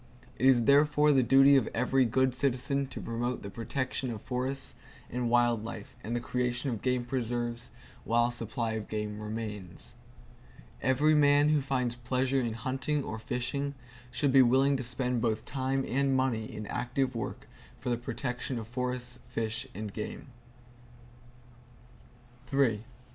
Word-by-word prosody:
It 130 - +4
is 125 -3 +6
therefore 150 +3 +5
the 135 -2 +5
duty 135 +3 +6
of 130 -5 +3
every 130 +2 +3
good 130 +2 +2
citizen 135 +1 0
to 130 - -7
promote 120 +2 -3
the 100 - -6
protection 130 +3 -2
of 115 -3 -4
forests 130 +4 -3 0.4
and 125 0 -1
wild 120 -2 +3
life 110 -2 -7
and 115 +3 -3
the - - +1
creation 125 +3 -1
of 115 - -4
game 125 -1 0
preserves, 120 -1 -2 0.3
while 120 +1 +3
a - - -4
supply 115 0 -2
of 110 -1 -4
game 105 -1 -4
remains. 105 -4 -5 0.9
Every 145 +4 +3
man 145 0 +5
who 150 -1 +3
finds 130 -3 0
pleasure 130 +2 0
in 115 -2 -1
hunting 130 +5 -1
or 110 - -5
fishing 140 +5 -2 0.3
should 130 +3 +1
be 135 - +8
willing 135 +3 +4
to 130 - -4
spend 125 0 -1
both 110 -2 0
time 135 0 -1
and 135 0 +2
money 120 -4 0
in 105 - -6
active 125 +4 -1
work 120 +3 -5 0.3
for 125 - -3
the 120 - +1
protection 125 +1 -3
of 110 -2 -5
forests, 125 0 -3
fish 115 -1 -2
and 105 0 -5
game. 110 +4 -6
125 Hz, 155 wpm, -30 LUFS, 115-135 Hz, 0.9 s, be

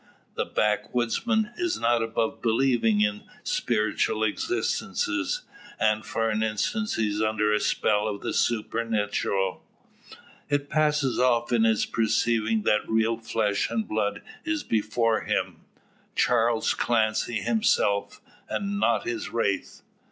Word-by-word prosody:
The - - -1
backwoodsman 125 - 0
is 355 -1 0
not 120 0 +2
above 115 0 -1
believing 115 -2 +2
in 105 0 +1 0.2
spiritual 110 -1 0
existences, 370 - -1 0.4
and 110 0 +2
for 115 - -1
an 105 +1 0
instant 110 - -1
he 110 - +1
is 105 +1 -2
under 110 -1 +1
a 105 - +2
spell 105 0 +1
of 100 -2 -4
the - - -3
supernatural. 105 -4 0 0.9
It 145 -1 -1
passes 150 -4 +1
off 120 -1 +2
on 115 -1 +4
his 110 -1 +2
perceiving 110 -1 +1
that 105 - +1
real 110 0 +2
flesh 110 -3 0
and 115 -1 -2
blood 105 -1 -1 0.2
is 320 -2 -2
before 110 +1 +1
him - - -1 0.6
Charles 115 -2 +2
Clancy 110 0 0
himself, 110 - +1 0.3
and 200 0 -2
not - - +2
his 355 -1 -3
wraith. - - -2
115 Hz, 125 wpm, -26 LUFS, 110-125 Hz, 0.9 s, on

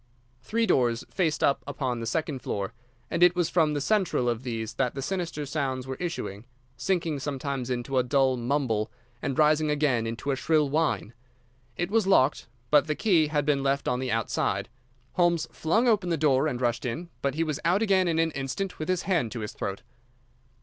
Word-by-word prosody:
Three 225 - 0
doors 120 - +2
faced 165 -6 0
up 140 - +2
upon 125 -4 -2
the 115 - -4
second 145 +2 -1
floor, 100 -2 -3 0.4
and 170 - -1
it 175 0 +6
was 175 -2 0
from 155 -4 +3
the - - 0
central 185 - +1
of 120 -1 0
these 115 -4 -4
that 130 -2 -1
the 135 - -3
sinister 170 -5 -3
sounds 135 -3 -2
were 130 - -4
issuing, 120 - -4 0.3
sinking 165 -3 -1
sometimes 135 -2 -3
into 130 +1 0
a - - +3
dull 130 0 +2
mumble 120 -3 -1 0.3
and 135 - -2
rising 155 0 +4
again 145 -6 +1
into 115 +5 -3
a - - +1
shrill 150 +2 +2
whine. 150 -7 0 0.6
It 175 +2 -2
was 220 -3 +2
locked, 145 -7 +3 0.2
but 150 0 +5
the 155 - 0
key 170 -7 +3
had 150 -1 0
been 145 -2 +2
left 140 +1 0
on 125 - +1
the 130 -1 -2
outside. 115 0 -1 0.4
Holmes 170 -2 +2
flung 220 +10 +1
open 200 -6 +2
the 165 - +1
door 145 -1 +3
and 125 -5 -2
rushed 120 -2 0
in, 160 +8 -4
but 140 -1 -1
he 165 - +1
was 155 -3 -2
out 185 +6 +3
again 190 -4 +3
in 165 -1 +1
an 165 0 +2
instant, 140 +8 -4
with 155 - -4
his 185 -1 +1
hand 165 - 0
to 120 - -4
his 105 - -5
throat. 100 +3 -4
145 Hz, 200 wpm, -27 LUFS, 125-165 Hz, 0.6 s, it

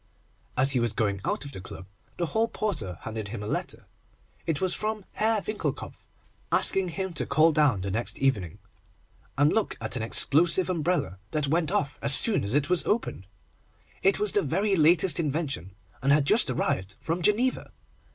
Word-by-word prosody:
As 135 +1 +4
he 130 - +2
was 120 -2 0
going 100 -3 -1
out - - -2
of 140 - -8
the 95 - -8
club, 95 - -9 0.3
the 175 - 0
hall 220 +7 0
porter 115 - -3
handed 110 -2 -5
him 105 0 -6
a - - -5
letter. - - -4 0.6
It 160 -3 0
was 185 -1 0
from 215 -2 -2
Herr 220 -1 +1
Winckelkopf, 215 - -4 0.5
asking 190 -2 +2
him 190 +1 -4
to - - 0
call 160 +1 +4
down 145 - +2
the 95 +1 -3
next 115 +4 -2
evening, 105 -12 0 0.8
and 145 +2 +4
look 220 - 0
at 110 +2 -4
an 125 - -2
explosive 165 +10 +2
umbrella, 170 - -1
that 150 0 -1
went 165 +1 +1
off 190 -8 -1
as 140 -1 +6
soon 215 - +3
as 100 +6 -1
it 145 -1 +2
was 180 0 +1
opened. 205 - -1 0.7
It 195 +1 +3
was 210 -2 0
the 205 - +2
very 195 +7 +1
latest 170 0 +4
invention, 140 - -3 0.3
and 135 +2 +2
had 145 -1 +4
just 220 - +4
arrived 100 -6 -1
from 165 +2 -3
Geneva. 230 +8 +1
150 Hz, 180 wpm, -27 LUFS, 115-190 Hz, 0.8 s, as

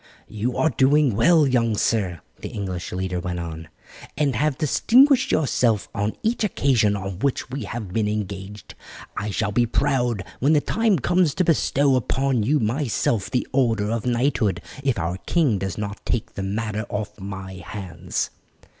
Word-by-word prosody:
"You 110 +4 -2
are 160 - +2
doing 135 -1 +3
well, 165 - +5
young 115 -5 +1
sir," 95 -9 0 0.2
the - - -6
English 95 -4 -5
leader 90 -1 -2
went 90 0 -4
on, 80 -1 -6 0.5
"and 140 -3 +1
have 150 -2 +1
distinguished 260 - +4
yourself 120 -8 +1
on 105 +2 -1
each 225 +1 0
occasion 125 - +2
on 95 -2 -5
which 135 0 -1
we 135 -4 -4
have 105 -3 -6
been 110 -1 +1
engaged. 100 -2 -5 0.4
I 105 - -3
shall 100 +1 -1
be 120 +3 +2
proud 120 -5 0 0.2
when 140 +5 +3
the 150 - +5
time 220 +5 +1
comes 175 +1 +2
to 185 - +2
bestow 140 -4 +2
upon 130 0 +1
you 145 +8 +2
myself 115 -3 0
the 125 - -1
order 115 -6 +1
of 115 +1 -2
knighthood 120 -7 +1 0.2
if 135 -5 +1
our 90 0 -2
king 145 - +2
does 95 -2 -4
not 100 -1 -5
take 115 -1 -2
the - - -5
matter 105 +2 -3
off 105 0 -4
my 95 -1 -7
hands." 95 -3 -4
115 Hz, 165 wpm, -23 LUFS, 100-140 Hz, 0.5 s, well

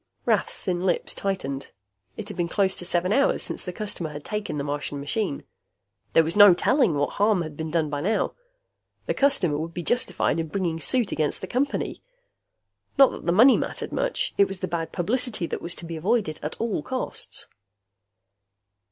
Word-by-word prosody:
Rath's - - +1
thin 180 -2 -1
lips 180 -2 0
tightened. 140 -9 -3 0.5
It 215 - -6
had - - -6
been 175 -2 -1
close 190 +2 +1
to 175 - +1
seven 180 +2 +1
hours 275 +3 +2
since - - -2
the 180 - -4
customer 180 -4 -2
had 150 -1 -9
taken 210 -7 -3
the 140 - -2
Martian 145 0 -3
machine. 145 +3 -2 0.7
There 165 - +6
was 165 +2 -2
no 205 -3 +9
telling 245 - +3
what 145 0 0
harm 205 -3 +2
had 155 -2 -8
been 160 +1 -4
done 155 -2 0
by 145 -1 -2
now. 215 +6 0 0.7
The - - 0
customer 200 - +2
would 165 +1 -5
be 175 - -3
justified 240 -5 0
in 165 - -2
bringing 170 -1 -2
suit 235 - +1
against 155 -2 -1
the - - -3
Company. 265 +8 -2 1.0
Not 275 -1 +7
that - - -9
the - - +4
money 235 +9 +7
mattered - - -4
much; - - -1
it 200 - +6
was 195 -1 -5
the 185 - -1
bad 165 -1 -3
publicity 215 +1 -1
that - - -4
was 170 +1 -2
to 175 - -8
be 165 -1 -5
avoided 185 -2 0
at 150 - -5
all 225 -8 -1
costs. 255 +10 -5
180 Hz, 190 wpm, -25 LUFS, 160-215 Hz, 1.0 s, no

